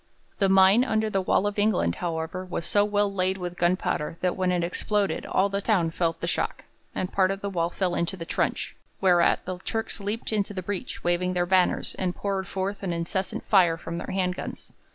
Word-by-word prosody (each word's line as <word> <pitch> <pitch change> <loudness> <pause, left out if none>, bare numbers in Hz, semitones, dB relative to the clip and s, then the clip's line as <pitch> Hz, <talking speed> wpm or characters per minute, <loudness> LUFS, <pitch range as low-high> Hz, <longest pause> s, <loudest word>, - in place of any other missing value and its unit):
The 195 -2 +3
mine 195 +4 +6
under 220 -2 0
the 195 - +1
wall 185 +1 +2
of 205 0 -1
England, 205 - +2
however, 165 +1 -3
was 180 -2 -4
so 205 - +4
well 205 -1 +1
laid 190 0 +1
with 180 -1 -5
gunpowder 175 -2 0
that 180 -1 +1
when 185 -1 +1
it 175 -1 +1
exploded 195 +1 -1
all 190 - +2
the 200 0 -2
town 185 -7 +2
felt 165 -1 -1
the 170 - -2
shock, - - -2 0.3
and 185 - -3
part 190 -1 +3
of 195 0 -3
the 200 - -3
wall 170 -2 0
fell 180 0 -1
into 170 +3 -1
the 165 - -6
trench, - - -1 0.2
whereat 180 -3 +3
the 185 -1 -4
Turks 225 +4 -4
leaped 210 +3 -3
into 205 -1 -1
the 185 - -3
breach 200 +1 -5
waving 175 +1 +1
their 175 -1 +1
banners 185 0 +2
and 180 -2 -1
poured 195 -1 -2
forth 195 +1 -3
an 190 -3 -2
incessant 170 +3 -2
fire 175 -5 +4
from 170 0 -5
their - - -6
hand 185 -1 0
guns. - - -7
185 Hz, 215 wpm, -26 LUFS, 175-200 Hz, 0.3 s, mine